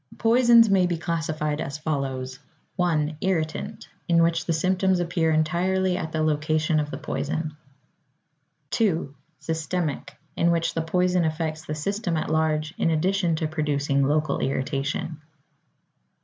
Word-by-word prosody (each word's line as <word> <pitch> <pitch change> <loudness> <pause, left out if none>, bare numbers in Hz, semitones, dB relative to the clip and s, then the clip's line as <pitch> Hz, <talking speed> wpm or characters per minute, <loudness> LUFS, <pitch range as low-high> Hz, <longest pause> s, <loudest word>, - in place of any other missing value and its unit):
Poisons 235 0 +6
may 190 -3 +3
be 175 -1 -1
classified 155 -2 -2
as 140 +1 -4
follows: 135 -4 -3 0.4
1. 160 -4 0
Irritant, 165 -5 -2 0.2
in 170 -1 +4
which 165 -1 +1
the - - +1
symptoms 185 +3 +2
appear 170 -2 0
entirely 180 +4 +1
at 160 -3 -4
the 155 0 0
location 155 +1 +1
of 150 -1 -2
the - - -5
poison. 155 +1 -3 1.2
2. 170 -10 0 0.2
Systemic, 160 -1 -3 0.2
in 170 - +2
which 165 -1 +1
the 165 - -1
poison 180 +2 +1
affects 160 0 -2
the 150 - -3
system 180 +2 -2
at 155 - -2
large 155 -1 0
in - - +2
addition 175 +1 +1
to 155 0 -1
producing 145 -3 0
local 150 +1 +1
irritation. 140 +3 -2
160 Hz, 135 wpm, -25 LUFS, 155-175 Hz, 1.2 s, Poisons